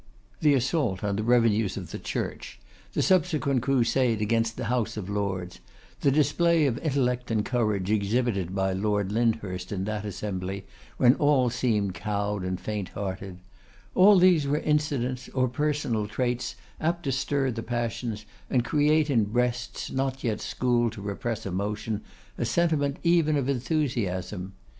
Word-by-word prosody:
The 150 -3 +4
assault 130 - 0
on 100 -1 0
the - - 0
revenues 115 -3 +3
of - - -7
the - - -5
Church; - - -4 0.3
the - - +1
subsequent 150 -8 +2
crusade 125 -2 +2
against 115 +1 0
the 125 - -3
House 115 -2 -1
of 100 -1 -5
Lords; 95 -3 -3 0.4
the 140 - +3
display 155 +3 +3
of 125 -4 0
intellect 125 -5 0
and 110 -2 0
courage 105 -6 0
exhibited 100 -3 0
by 95 -1 +1
Lord 105 0 0
Lyndhurst 105 -5 -1
in 95 -2 -2
that 105 0 -3
assembly, 100 -1 -4 0.3
when 125 0 +6
all 140 -4 +3
seemed 105 -6 0
cowed 105 -1 -2
and 95 0 -2
faint 105 -4 -4
hearted; 95 -1 -5 0.5
all 195 +2 +7
these 175 -5 +5
were 145 +2 +1
incidents 145 -5 -1
or 130 -1 +3
personal 125 -5 -1
traits 125 +3 -2 0.2
apt 170 +2 -1
to 135 - -1
stir 135 0 0
the 115 -1 -4
passions, 115 -1 -3 0.2
and 125 -2 +1
create 150 +1 +3
in 115 -5 +3
breasts 125 +3 -2
not 135 0 -2
yet 110 -3 -1
schooled 120 -2 +1
to 105 - -8
repress 110 +2 -3
emotion, 105 +3 -2 0.4
a - - +1
sentiment 145 +1 +1
even 165 -3 +3
of 135 -2 -1
enthusiasm. 120 - -1
120 Hz, 150 wpm, -27 LUFS, 105-135 Hz, 0.5 s, all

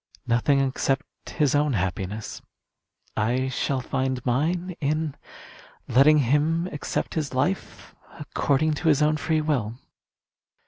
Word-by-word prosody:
"Nothing 120 +4 +2
except 135 +1 -2
his 150 -4 +1
own 145 -1 +2
happiness. 95 +2 -3 0.7
I 125 +5 0
shall 130 +1 -1
find 130 -1 -2
mine 170 +8 0
in 155 0 -1 0.7
letting 145 +5 +6
him 150 +5 +2
accept 150 - -3
his 150 -5 -3
life 180 +9 -2 0.3
according 150 +1 +1
to 170 - -1
his 150 -1 +4
own 155 0 +2
free 155 +1 0
will." 130 -8 -1
140 Hz, 120 wpm, -25 LUFS, 130-155 Hz, 0.7 s, letting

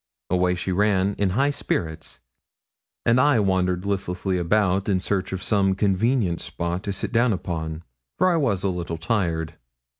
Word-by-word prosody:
Away 90 0 +2
she 90 +2 -3
ran, 100 0 +2
in 100 -2 +2
high 140 +2 +3
spirits, 80 - -3 0.8
and 120 +2 +4
I 145 -3 +4
wandered 95 -2 +1
listlessly 95 -1 -1
about 95 +2 +1
in 95 -2 +2
search 95 0 -2
of 95 0 -4
some 95 -3 +2
convenient 100 -1 +1
spot 85 +1 -3
to 100 - -1
sit 95 - -3
down 120 0 +3
upon, 80 -3 -4 0.3
for 185 - +3
I - - +2
was 110 - 0
a 100 - +1
little 85 -2 -4
tired. 85 -4 -1
95 Hz, 160 wpm, -24 LUFS, 90-105 Hz, 0.8 s, and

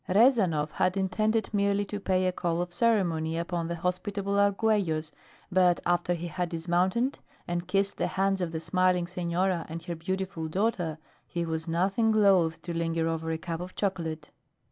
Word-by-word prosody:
Rezanov 190 - +4
had 185 +1 +1
intended 215 +4 0
merely 200 0 +2
to 205 +1 -5
pay 185 -2 +1
a 185 - +2
call 170 -2 -1
of 175 0 -3
ceremony 175 -7 +1
upon 170 0 -2
the 170 - -2
hospitable 195 +3 -2
Arguellos, 200 -6 +1 0.4
but 180 -1 +4
after 175 0 +1
he 170 +1 -5
had 175 +1 -2
dismounted 180 +10 0 0.3
and 175 0 -2
kissed 195 +1 0
the - - 0
hands 195 0 0
of 175 -2 -1
the 160 - -3
smiling 180 +2 +2
senora 180 0 -1
and 165 +1 -6
her 170 0 -4
beautiful 185 0 -3
daughter 175 -3 -1 0.3
he 170 -1 -2
was 160 0 -3
nothing 195 +7 +2
loath 190 -6 +4
to 175 - -4
linger 165 -1 0
over 165 0 -2
a 160 - -1
cup 165 0 -5
of 180 +1 -8
chocolate. 165 -6 -3
180 Hz, 170 wpm, -28 LUFS, 165-195 Hz, 0.4 s, Rezanov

